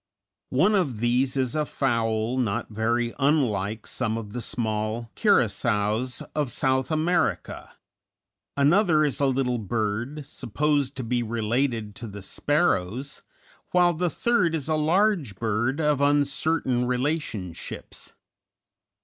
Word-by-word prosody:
One 180 +12 +3
of 155 - +1
these 125 +4 +1
is 130 -3 0
a 155 - +1
fowl 115 -4 0
not 110 -6 -1
very 115 +2 0
unlike 115 -8 +1
some 110 +1 -2
of 105 -2 -7
the 125 - -3
small 110 0 -2
curassows 115 - +1
of 145 -5 -1
South 130 +2 0
America; 165 +2 -1 0.8
another 155 +2 +4
is 145 - -1
a 140 - +3
little 130 -2 0
bird, 115 +7 -2
supposed 145 +3 -1
to 130 - -4
be 120 +1 0
related 115 0 -1
to 115 - -6
the 100 -1 -9
sparrows, 135 - 0 0.5
while 175 -1 +4
the 175 +2 0
third 180 -6 +1
is 150 -3 -3
a 160 - +1
large 165 - +2
bird 115 +6 -1
of 150 -3 +1
uncertain 145 -2 +2
relationships. 125 - -4
130 Hz, 125 wpm, -25 LUFS, 115-150 Hz, 0.8 s, another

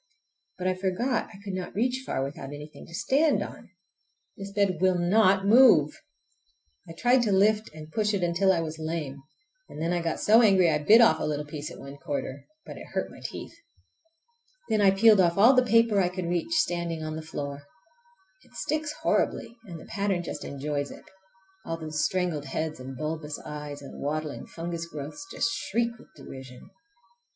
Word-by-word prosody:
But 185 0 -2
I 185 - +2
forgot 195 +7 -1
I 200 - -12
could 200 -2 -5
not 185 -1 -5
reach 250 +4 0
far 135 - -2
without 140 0 -6
anything 150 +1 -10
to - - -14
stand 290 - +2
on! - - -10 0.7
This 195 0 -8
bed 200 -4 +1
will 185 -1 +3
not 190 +2 +3
move! 215 - +6 0.9
I - - -7
tried 245 +8 +3
to 220 -3 +1
lift 210 +3 +3
and 155 0 -11
push 210 +2 +1
it 190 - -1
until 175 +3 +3
I 170 -3 +1
was 160 0 -5
lame, 155 -4 -4 0.5
and - - -9
then 165 +2 0
I 175 - 0
got 165 -1 -2
so 220 +3 +6
angry 190 -6 +5
I 150 - +1
bit 215 +10 +6
off 230 - +5
a - - -3
little 150 -1 -2
piece 150 0 -6
at - - -10
one 140 +1 -10
corner—but 140 - -7
it - - -10
hurt - - -1
my - - -13
teeth. - - -7 1.2
Then 215 -1 +2
I 200 - +6
peeled 205 +2 +6
off 170 0 +2
all 230 +7 +7
the 255 - +5
paper 230 -4 +3
I 180 - +1
could 180 -1 -5
reach 175 - -1
standing 170 - 0
on 155 0 -4
the 160 - -5
floor. 145 -3 -6 0.8
It - - -23
sticks 305 -1 -2
horribly 235 - 0
and 170 -5 -8
the - - -12
pattern 200 -3 -1
just - - -6
enjoys 145 0 -3
it! - - -12 0.6
All 165 - -4
those 155 -1 -3
strangled 175 -6 -1
heads 155 +3 -3
and 130 0 -8
bulbous 155 0 -4
eyes 150 -1 -7
and 140 - -10
waddling 150 +1 -3
fungus 170 0 -5
growths 155 - -8
just 230 - 0
shriek 235 +2 -1
with - - -16
derision! 130 -2 -11
175 Hz, 190 wpm, -27 LUFS, 150-210 Hz, 1.2 s, all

